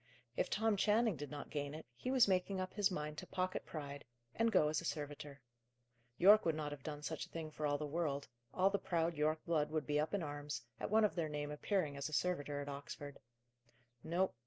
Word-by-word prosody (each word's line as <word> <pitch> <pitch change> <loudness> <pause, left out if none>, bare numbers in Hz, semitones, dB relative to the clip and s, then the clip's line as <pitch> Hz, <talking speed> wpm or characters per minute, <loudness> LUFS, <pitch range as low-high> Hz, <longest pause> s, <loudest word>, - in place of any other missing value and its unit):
If - - 0
Tom 220 0 +2
Channing 215 +1 +3
did 145 -1 -6
not 145 -1 -7
gain 145 0 -2
it, 160 - -8
he 250 - -4
was 255 -3 +6
making 190 0 +1
up 185 0 -3
his 205 -1 +3
mind 150 -4 -3
to - - -8
pocket 185 0 -2
pride, 145 -2 -6 0.3
and 230 0 +2
go 155 - +5
as 150 +1 +1
a - - -9
servitor. 145 -3 -4 0.8
Yorke 210 +4 +8
would 165 -2 +2
not 150 -1 -3
have 145 -2 -6
done 150 +1 -6
such 160 +1 -3
a - - -25
thing 160 -2 -5
for 150 -1 0
the 150 - -3
world; 145 -2 -1 0.2
all 190 +1 +3
the 200 - +1
proud 170 -2 +1
Yorke 155 +1 0
blood 155 -3 +2
would 155 -1 -1
be 150 0 +1
up 155 +6 0
in 195 - -1
arms, 145 -2 -4 0.2
at - - -2
one 215 +1 +5
of 210 - +1
their 165 -3 -1
name 150 0 -3
appearing 150 -1 0
as 140 - -2
a - - -9
servitor 145 -5 0
at 140 - -6
Oxford. 140 0 -6 0.8
No. 180 +4 +1
155 Hz, 225 wpm, -38 LUFS, 145-185 Hz, 0.8 s, Yorke